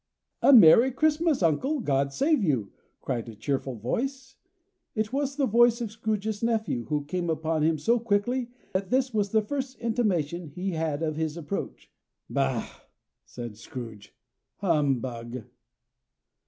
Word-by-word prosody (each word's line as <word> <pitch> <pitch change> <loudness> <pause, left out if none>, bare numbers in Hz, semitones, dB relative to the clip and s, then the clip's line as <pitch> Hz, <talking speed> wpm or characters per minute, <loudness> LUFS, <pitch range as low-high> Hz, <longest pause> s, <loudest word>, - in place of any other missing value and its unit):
"A - - +6
merry 230 - +8
Christmas, 310 - +1
uncle! 260 - +1
God 140 - 0
save 285 - +2
you!" 130 - 0 0.3
cried 120 -3 -3
a 110 - -10
cheerful 130 +3 -2
voice. 260 - -3 0.6
It 215 +1 -1
was 280 0 -1
the 280 -2 +1
voice 235 0 +4
of 230 -4 -4
Scrooge's 215 -1 -2
nephew, 220 - 0
who 150 -2 -2
came 175 +3 -2
upon 160 0 0
him 160 +1 +2
so 235 +11 +2
quickly 235 +3 0 0.2
that 190 0 -1
this 255 0 +1
was 205 -2 +1
the 220 +1 +2
first 265 +3 -4
intimation 180 -9 -1
he 180 +6 -4
had 160 -2 -2
of 155 -1 -2
his 160 0 -2
approach. 170 +4 -5 0.4
"Bah!" 65 - 0 0.6
said 120 -3 -8
Scrooge. 115 -3 -9 0.4
"Humbug!" 130 - -1
190 Hz, 140 wpm, -27 LUFS, 145-240 Hz, 0.6 s, merry